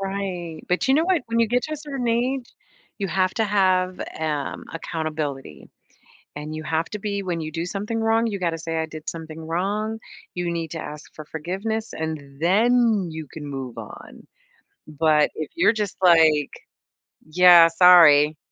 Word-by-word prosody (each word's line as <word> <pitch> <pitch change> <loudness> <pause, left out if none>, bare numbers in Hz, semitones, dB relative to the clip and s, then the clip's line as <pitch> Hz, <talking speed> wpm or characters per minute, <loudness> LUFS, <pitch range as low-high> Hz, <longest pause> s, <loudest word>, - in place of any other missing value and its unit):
Right 190 -5 -4
but 180 +8 0
you 265 - +5
know 315 +3 +3
what? 360 -4 +1
When 230 0 -1
you 230 - +4
get 245 +3 0
to 310 - -5
a - - -2
certain 275 -5 -4
age, 245 +2 0 0.5
you 200 - -2
have 185 +2 +1
to 225 - +1
have, 185 -3 +1
eh 160 - -5
um, 150 -2 -3
accountability, 155 - -5 0.7
and 150 +1 -6
you 155 - -6
have 160 +1 -1
to 210 - -5
be 200 -1 -3
when 175 -3 -3
you 155 0 -5
do 165 +2 -3
something 210 +5 -4
wrong, 225 +1 +2
you 205 -3 -4
gotta 170 -2 -1
say, 165 0 -4
"I 160 - 0
did 155 -1 -8
something 160 -1 -8
wrong," 200 +7 -2 0.4
you 175 -1 -2
need 165 -2 -4
to 165 - -5
ask 150 -1 -9
for 155 - -9
forgiveness, 195 +9 -4
and 150 -3 -6
then 220 +3 +3
you 160 -1 -7
can 155 -2 -8
move 135 -4 -6
on. 110 -2 -11 0.6
But 155 0 +2
if 155 - -5
you're 340 -8 +4
just 210 -3 -3
like, 160 -5 +5 0.8
"Yeah, 175 0 +8
sorry" 165 -4 +6
175 Hz, 180 wpm, -23 LUFS, 155-210 Hz, 0.8 s, Yeah